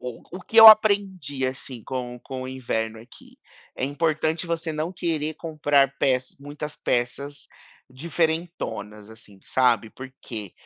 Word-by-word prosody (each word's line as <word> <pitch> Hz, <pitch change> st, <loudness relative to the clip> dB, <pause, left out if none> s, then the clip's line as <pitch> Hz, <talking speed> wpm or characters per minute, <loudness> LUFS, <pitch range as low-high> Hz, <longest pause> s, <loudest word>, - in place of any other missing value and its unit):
o 125 Hz, +9 st, -9 dB
que 225 Hz, -, -8 dB
eu 225 Hz, 0 st, +11 dB
aprendi, 200 Hz, -10 st, +5 dB
assim, 130 Hz, -3 st, -7 dB
com 125 Hz, -2 st, -5 dB
com 130 Hz, +1 st, -7 dB
o 130 Hz, -, -6 dB
inverno 115 Hz, -4 st, -3 dB
aqui, 120 Hz, +2 st, -17 dB, 0.4 s
é -, -, -1 dB
importante 155 Hz, +3 st, -1 dB
você 165 Hz, -1 st, -3 dB
não 155 Hz, +3 st, -3 dB
querer 160 Hz, -3 st, -2 dB
comprar 145 Hz, -4 st, +1 dB
peça 130 Hz, -1 st, 0 dB
muitas 145 Hz, +1 st, -7 dB
peças 125 Hz, +4 st, -3 dB, 0.4 s
diferentonas, 160 Hz, -, -3 dB
assim, 105 Hz, -3 st, -16 dB
sabe, 120 Hz, -4 st, +1 dB
porque, 125 Hz, -6 st, -9 dB
140 Hz, 130 wpm, -24 LUFS, 125-160 Hz, 0.4 s, eu